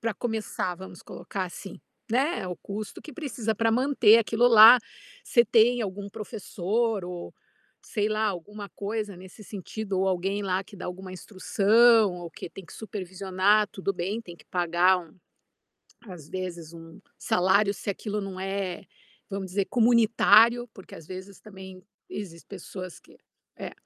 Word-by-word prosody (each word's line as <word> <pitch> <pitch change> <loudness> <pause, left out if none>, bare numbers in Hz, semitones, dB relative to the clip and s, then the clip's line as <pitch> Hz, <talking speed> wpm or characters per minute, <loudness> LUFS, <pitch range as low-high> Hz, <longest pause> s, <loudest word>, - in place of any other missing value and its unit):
Para 225 -2 -2
começar 220 -6 -3
vamos 185 -1 -11
colocar 190 -2 -5
assim, 185 +2 -9 0.3
né 265 - 0
o 180 - -4
custo 205 +1 -7
que 305 - -10
precisa 240 -7 -3
para 225 +1 +1
manter 245 -3 +5
aquilo 230 +1 +2
lá, 230 +1 +10 0.5
você 235 -2 +4
tem 235 +2 +4
algum 200 0 -5
professor 215 0 -2
ou, 180 -1 -7 0.5
sei 210 -1 -1
lá, 215 0 0
alguma 205 +2 -5
coisa 210 0 -4
nesse 190 +4 -13
sentido 200 0 -4
ou 190 - +2
alguém 195 +2 -1
lá 190 0 -1
que 205 - -15
dá 185 - -7
alguma 185 +1 -7
instrução 210 +3 +3
ou 175 -1 -8
que 165 - -8
tem 195 - -11
que - - -15
supervisionar, 195 0 0
tudo 195 0 -3
bem, 195 +6 -3
tem 175 -5 -11
que - - -20
pagar 180 +1 +2
um 170 -2 -13 0.9
às 170 -6 -10
vezes, 175 -2 -6
um 165 0 -12 0.2
salário, 195 +3 +2
se 205 - -9
aquilo, 210 +1 -4
né, 195 -1 -4 0.5
vamos 195 -1 -4
dizer 195 +2 0
comunitário, 235 0 +4
porque, 190 - -13
às 155 - -12
vezes, 190 +1 -9
também 190 -3 -12 0.3
existe 170 -5 -8
pessoas 185 -2 -9
que - - -20 0.4
Ée, - - -6
200 Hz, 155 wpm, -26 LUFS, 185-220 Hz, 0.9 s, lá